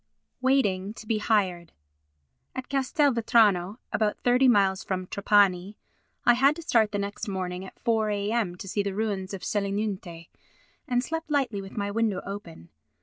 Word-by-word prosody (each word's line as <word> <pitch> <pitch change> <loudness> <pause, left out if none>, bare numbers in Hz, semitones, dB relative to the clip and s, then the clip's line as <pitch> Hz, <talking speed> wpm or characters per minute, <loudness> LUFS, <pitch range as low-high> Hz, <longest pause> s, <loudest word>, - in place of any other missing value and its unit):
Waiting 210 -7 +1
to 220 - -10
be 215 0 0
Hired 185 -6 0 0.8
At 260 -1 -6
Castelvetrano 235 - +2 0.2
(about 215 -1 +1
thirty 250 +2 +4
miles 195 -5 +3
from 185 -1 -3
Trapani) 200 0 +2 0.5
I 240 - +7
had 275 +4 +4
to 335 - -8
start 225 -9 +2
the 205 - -1
next 200 +3 -4
morning 185 -2 -3
at 190 - -11
4 220 -2 +1
a.m. 205 -2 -1
to 185 - -9
see 205 +2 -1
the 200 -1 -3
ruins 205 -3 -2
of 195 -2 -6
Selinunte, 200 -5 -3 0.6
and 245 -2 +1
slept 325 +2 -4
lightly 260 -9 0
with 195 +2 -11
my 200 -1 -1
window 215 -3 0
open. 180 - -8
205 Hz, 155 wpm, -27 LUFS, 190-235 Hz, 0.8 s, I